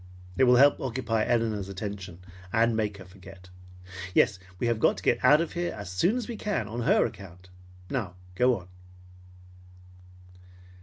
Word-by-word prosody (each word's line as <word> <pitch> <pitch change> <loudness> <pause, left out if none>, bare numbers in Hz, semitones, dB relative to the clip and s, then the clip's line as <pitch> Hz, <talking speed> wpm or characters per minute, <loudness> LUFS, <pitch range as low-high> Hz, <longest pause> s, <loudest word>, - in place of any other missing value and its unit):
It 130 - +4
will 125 0 +6
help 140 +3 +5
occupy 115 -4 -1
Elinor's 110 -5 0
attention 95 -3 -7 0.3
and 115 +2 +2
make 105 -2 -1
her 95 - -11
forget. 95 0 -15 0.7
Yes, 100 -4 +3 0.2
we 120 - -2
have 115 -2 0
got - - +3
to - - -9
get - - +1
out 150 +2 +6
of 170 - -4
here 175 0 -2
as 100 -3 -7
soon 100 - +1
as 250 - -4
we 235 -3 -6
can 205 - -2
on 115 +3 -5
her - - +3
account. 90 -2 -10 0.4
Now 100 -6 -3 0.2
go 125 +4 +3
on." 90 - -12
110 Hz, 165 wpm, -27 LUFS, 95-125 Hz, 0.7 s, will